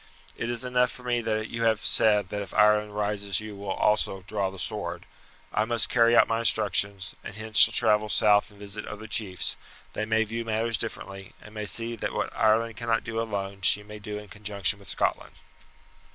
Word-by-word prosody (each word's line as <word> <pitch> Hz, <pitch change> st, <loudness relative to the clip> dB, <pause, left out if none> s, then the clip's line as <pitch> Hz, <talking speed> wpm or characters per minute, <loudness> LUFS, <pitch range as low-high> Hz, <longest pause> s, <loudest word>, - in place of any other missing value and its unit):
It 115 Hz, -, -4 dB
is 120 Hz, +1 st, -3 dB
enough 125 Hz, 0 st, +2 dB
for 125 Hz, -, -13 dB
me 120 Hz, -1 st, 0 dB
that 110 Hz, -1 st, -2 dB
you 115 Hz, -, -5 dB
have 110 Hz, -2 st, +1 dB
said 105 Hz, -3 st, +3 dB
that 105 Hz, -, -4 dB
if 100 Hz, -, -8 dB
Ireland 105 Hz, 0 st, +3 dB
rises 100 Hz, -2 st, -1 dB
you 110 Hz, -1 st, -8 dB
will 100 Hz, 0 st, -7 dB
also 95 Hz, -1 st, +1 dB
draw 100 Hz, -1 st, -2 dB
the 95 Hz, -, -11 dB
sword. -, -, -4 dB, 0.5 s
I 110 Hz, -, +2 dB
must 115 Hz, 0 st, +1 dB
carry 120 Hz, -1 st, +4 dB
out -, -, +6 dB
my 115 Hz, 0 st, 0 dB
instructions, 100 Hz, -3 st, +2 dB
and 100 Hz, -, -8 dB
hence 110 Hz, 0 st, -2 dB
shall 115 Hz, -, +8 dB
travel 105 Hz, 0 st, +2 dB
south 105 Hz, -1 st, +3 dB
and 105 Hz, -, -19 dB
visit 100 Hz, +1 st, -8 dB
other 105 Hz, +1 st, -8 dB
chiefs; 105 Hz, -4 st, -2 dB, 0.4 s
they 110 Hz, -, -2 dB
may 110 Hz, 0 st, +2 dB
view 115 Hz, +2 st, -4 dB
matters 115 Hz, 0 st, 0 dB
differently, 95 Hz, -4 st, -6 dB
and 105 Hz, -, -14 dB
may 105 Hz, -1 st, -5 dB
see 115 Hz, +2 st, -1 dB
that -, -, -4 dB
what -, -, -3 dB
Ireland 110 Hz, 0 st, +2 dB
cannot 115 Hz, -1 st, 0 dB
do 115 Hz, -1 st, -3 dB
alone 100 Hz, -3 st, -4 dB
she 105 Hz, +2 st, +5 dB
may 105 Hz, 0 st, -10 dB
do 105 Hz, 0 st, -6 dB
in 105 Hz, 0 st, -9 dB
conjunction 105 Hz, 0 st, +1 dB
with 100 Hz, -, -14 dB
Scotland." -, -, -2 dB
105 Hz, 205 wpm, -26 LUFS, 100-115 Hz, 0.5 s, shall